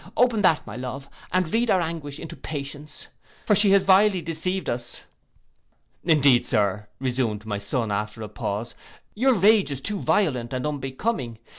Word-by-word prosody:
Open 240 -3 +3
that, 165 -6 +3
my 105 - -8
love, 130 +2 -6 0.2
and 185 -3 0
read 235 +1 +2
our 190 - +4
anguish 160 -4 -4
into 165 - -8
patience, 145 0 -7 0.4
for 210 - +4
she 205 0 +4
has 195 -1 +5
vilely 195 0 +5
deceived 180 +3 -3
us.'—'Indeed, 120 - -2
Sir,' 105 -1 0
resumed 120 -5 -1
my 105 -2 -3
son, 105 +2 -1
after 105 +2 -3
a - - -5
pause, 105 +3 -4 0.4
'your 255 +4 +3
rage 205 0 +4
is 140 -2 -4
too 200 +8 -4
violent 145 - 0
and 130 +1 -2
unbecoming. 135 - -3
145 Hz, 155 wpm, -24 LUFS, 120-190 Hz, 0.4 s, has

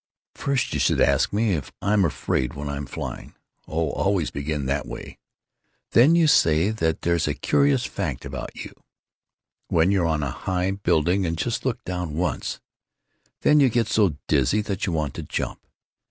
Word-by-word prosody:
First 140 -2 -1
you - - -1
should - - +2
ask 70 -1 +3
me 105 0 +1
if 75 -6 -3
I'm 100 0 +2
afraid 65 -4 -1
when 70 +1 -5
I'm 70 0 -4
flying. - - -7 0.3
Oh, 80 -1 -1
always 95 -5 0
begin 70 0 -3
that 70 +1 -1
way. - - -9 0.7
Then 135 +8 +6
you 170 -1 +4
say 85 - +4
that 80 -7 -1
there's 85 -1 +1
a - - -1
curious 140 -3 +2
fact 80 -11 -4
about - - -6
you—when 85 +3 -5
you're 95 -4 +2
on 80 -2 0
a 70 - -2
high 90 +4 -1
building 95 -1 +1
and 85 0 -2
just 120 +7 -2
look 120 -1 -2
down 90 -4 -4
once, 90 +3 -2 0.8
then 150 0 +5
you 135 -3 +5
get 115 -2 +1
so 100 -10 +2
dizzy 70 - +2
that 100 -2 -3
you - - 0
want 75 -4 -1
to 80 - -6
jump. 75 - -4
90 Hz, 170 wpm, -24 LUFS, 75-105 Hz, 0.8 s, Then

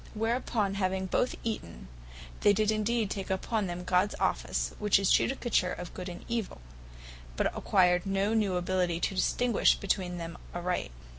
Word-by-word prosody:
Whereupon 225 -2 0
having 190 0 0
both 245 +6 0
eaten, 85 - -5 0.5
they 205 - +5
did 215 +1 +2
indeed 215 0 0
take 195 -2 -4
upon 195 +2 -1
them 175 0 -5
Gods 185 +3 +2
office, - - 0
which 210 -1 +4
is 195 -1 +2
Judicature 240 -8 +1
of 180 -1 -7
Good 180 0 -6
and 175 - -9
Evill; 230 - -3 0.8
but - - 0
acquired 180 -1 +3
no 195 +2 +1
new 210 -4 +1
ability 180 -1 0
to 195 - -1
distinguish 235 +4 +3
between 185 -3 -1
them 170 0 -7 0.2
aright. 175 - -2
190 Hz, 155 wpm, -30 LUFS, 180-215 Hz, 0.8 s, they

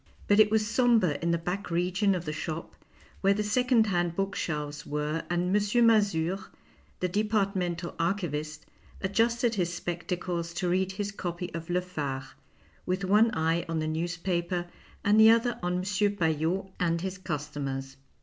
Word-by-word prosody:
But 205 +1 +4
it 215 -1 +7
was 215 0 +2
sombre 230 - +3
in 170 - 0
the 170 - +2
back 180 +4 -4
region 185 +4 +1
of 180 - -4
the 150 - -3
shop 160 +1 -5 0.5
where 195 0 +4
the 210 - 0
second 245 +2 +3
hand 175 -4 0
book 195 +1 -1
shelves 150 -2 -3
were 150 +2 -2
and 175 +2 +1
M. 210 +3 +3
Mazure, 195 -5 +3 0.6
the 180 - +2
departmental 195 -4 -1
archivist, 155 -4 -2 0.4
adjusted 230 +5 +1
his 180 -5 0
spectacles 175 0 -3
to 180 0 -1
read 190 +1 +1
his 200 +1 -3
copy 175 -2 -5
of 165 0 -6
Le 180 +1 +1
Phare, 145 -7 -4 0.5
with 185 +2 -1
one 210 +4 +5
eye 165 +1 +1
on 165 - -1
the 155 0 -1
newspaper 175 +2 -1 0.4
and 210 +2 +4
the 220 0 +9
other 230 +1 +3
on 180 0 -1
M. 180 - 0
Paillot 195 -2 0
and 170 -2 +1
his 190 +1 -4
customers. 140 -5 -4
180 Hz, 160 wpm, -28 LUFS, 165-205 Hz, 0.6 s, the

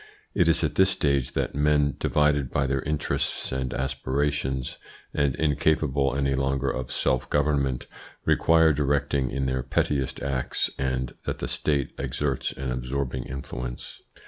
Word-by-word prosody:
It 90 - +3
is 85 0 +3
at 75 - +1
this 95 0 +4
stage 70 -8 +1
that - - -1
men, 75 -1 +2
divided 75 -3 +2
by 70 - +1
their 70 0 0
interests 75 +1 -2
and 65 -1 -2
aspirations, 65 0 -1 0.4
and 70 -2 +1
incapable 75 -2 +1
any 70 0 +1
longer 70 0 0
of 65 0 -4
self 65 0 0
government, 70 -3 +1 0.4
require 80 -1 +5
directing 70 -2 +1
in 70 +2 -2
their 65 0 0
pettiest 65 +1 0
acts, 70 -2 0
and 65 -2 -1
that - - -2
the - - -3
State 70 -3 0
exerts 70 -3 -1
an 65 -1 -4
absorbing 65 0 -2
influence. 60 -2 -6
70 Hz, 145 wpm, -26 LUFS, 65-75 Hz, 0.4 s, require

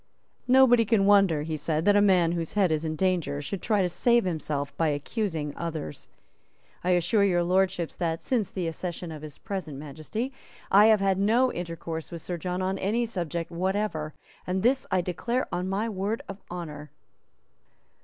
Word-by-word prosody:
"Nobody 250 -2 +6
can 215 -3 +2
wonder," 195 -7 +4
he 160 0 -3
said, 155 +2 -1
"that 205 0 +5
a 205 - +5
man 185 -5 +4
whose 170 -2 -3
head 195 -5 +3
is 155 0 0
in 155 -1 -2
danger 170 -5 0
should 145 +7 -4
try 210 -4 +2
to - - +2
save 235 +6 +3
himself 150 -5 -3
by 165 - +1
accusing 155 0 -2
others. 160 - -5 0.8
I 180 - 0
assure 180 +5 +2
Your 175 -3 +3
Lordships 185 -1 +1
that, 165 -2 -2
since 225 -7 0
the 185 -3 -3
accession 175 +1 -5
of 155 -2 -8
his 155 -2 -9
present 185 -8 -5
Majesty, 155 - -5 0.4
I 205 +2 +7
have 215 -2 +5
had 195 -1 +2
no 235 +6 +3
intercourse 165 -2 -5
with 170 -2 -7
Sir 175 - -4
John 180 +2 -3
on 190 +1 -1
any 225 +5 0
subject 170 -6 -4
whatever; 180 -3 -2 0.3
and 185 +1 -1
this 260 +2 +2
I 185 - +2
declare 235 +8 -2
on 180 +1 -2
my 205 +4 -1
word 210 +1 -2
of 195 0 -8
honour." 150 -4 -7
180 Hz, 180 wpm, -27 LUFS, 160-205 Hz, 0.8 s, I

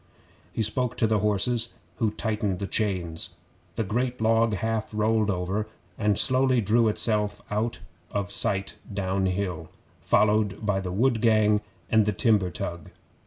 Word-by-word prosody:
He 110 - -1
spoke 125 +3 -1
to - - +3
the 110 -1 +2
horses, 110 +3 0 0.2
who 110 - +2
tightened 105 -3 -2
the 100 - -3
chains. 90 -6 -2 0.5
The 115 - 0
great 120 +5 -1
log 115 0 +3
half 110 +2 -2
rolled 110 0 +2
over, 95 +3 -1 0.3
and 105 -2 +1
slowly 130 -1 +3
drew 115 +2 +3
itself 105 -1 0
out 110 +3 -1 0.3
of 100 -1 -3
sight 100 -1 -1
downhill, 95 -3 -1 0.3
followed 105 0 +2
by 100 -2 +1
the 95 -2 -4
wood 115 +3 +2
gang 110 -2 +4 0.3
and 110 -1 +4
the 105 - +2
timber 100 -2 +2
tug. 85 -1 -5
105 Hz, 145 wpm, -26 LUFS, 100-115 Hz, 0.5 s, gang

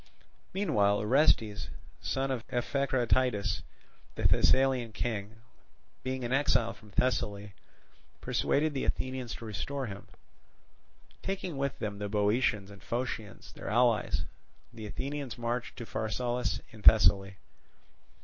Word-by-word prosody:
Meanwhile 105 - +2
Orestes, 105 - +3 0.3
son 135 0 -1
of 125 -4 -2
Echecratidas, 125 -3 +1 0.5
the - - -4
Thessalian 130 -4 +4
king, 110 -2 -3 0.7
being 130 0 -3
an 120 +1 -1
exile 130 -4 +3
from 105 - -17
Thessaly, 105 -3 0 0.7
persuaded 155 +1 +1
the 135 - -2
Athenians 130 -3 -2
to 115 - -9
restore 120 +7 -3
him. 100 -3 -8 1.1
Taking 190 -4 -3
with 140 -1 -2
them 105 -1 -4
the 105 0 -3
Boeotians 105 -1 +1
and 100 - -13
Phocians 120 -3 -4
their - - -7
allies, 120 0 +2 0.5
the 110 -2 -7
Athenians 140 +2 -4
marched 120 +1 -3
to 120 - -6
Pharsalus 120 +4 -1
in 110 - -13
Thessaly. 100 -3 +6
120 Hz, 115 wpm, -31 LUFS, 105-130 Hz, 1.1 s, Thessaly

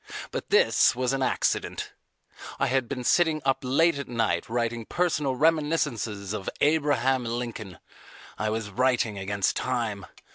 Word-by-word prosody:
But - - -5
this - - +4
was 130 +1 0
an 135 - -1
accident. 130 - -1 0.7
I - - +2
had 130 -2 0
been 125 -3 -4
sitting 160 +3 +3
up 135 -1 +2
late 145 +4 +2
at 140 - -5
night 115 -3 -1
writing 115 0 -1
personal 150 -2 0
reminiscences 140 - 0
of 100 -3 -3
Abraham 145 -4 +2
Lincoln. 115 -6 -5 0.6
I 110 - -2
was 110 -1 -3
writing 120 -2 +1
against 100 0 0
time. 115 -6 -2
125 Hz, 140 wpm, -26 LUFS, 110-140 Hz, 0.7 s, this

